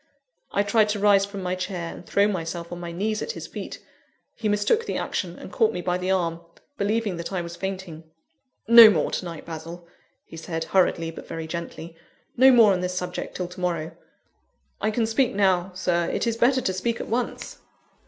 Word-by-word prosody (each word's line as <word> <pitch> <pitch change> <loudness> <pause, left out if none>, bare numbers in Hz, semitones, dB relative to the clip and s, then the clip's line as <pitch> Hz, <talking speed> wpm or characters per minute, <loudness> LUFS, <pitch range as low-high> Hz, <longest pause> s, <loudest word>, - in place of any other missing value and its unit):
I 200 - +2
tried 210 +1 +3
to 210 0 -1
rise 200 -1 +4
from 200 -1 -7
my 180 0 -1
chair, 185 -2 -4
and - - -11
throw 200 +3 +2
myself 170 -3 -4
on 175 - -6
my 170 -1 -6
knees 210 +5 -2
at 465 - -3
his - - -7
feet. - - -7 0.6
He 215 - -2
mistook 210 - +1
the - - -2
action, - - -3
and - - -10
caught 450 - +2
me - - -3
by 180 +1 0
the 185 +1 -3
arm, 170 -3 0 0.3
believing 210 -3 -1
that 170 +2 -5
I 185 -2 -1
was 170 0 -7
fainting. 185 -4 -6 0.6
"No 230 -1 +11
more 165 -8 +1
to - - -2
night, 170 -3 -7
Basil," 165 +1 -8 0.4
he 165 - -11
said, 165 0 -4
hurriedly, 165 -2 +1
but - - -11
very 165 -1 -5
gently; 170 0 -7 0.4
"no 260 +2 +7
more 230 -5 +6
on 180 - -1
this 180 0 -2
subject 180 -1 -4
till 180 - -3
to 180 - -11
morrow." 170 -3 -2 0.9
"I 215 - +1
can 225 +1 0
speak 240 +2 +1
now, 190 -2 +2
Sir; 175 -2 0
it - - -1
is 230 -1 0
better 255 +3 +3
to 190 - -1
speak 230 +5 -2
at - - -5
once." 240 +2 -3
185 Hz, 205 wpm, -24 LUFS, 170-210 Hz, 0.9 s, No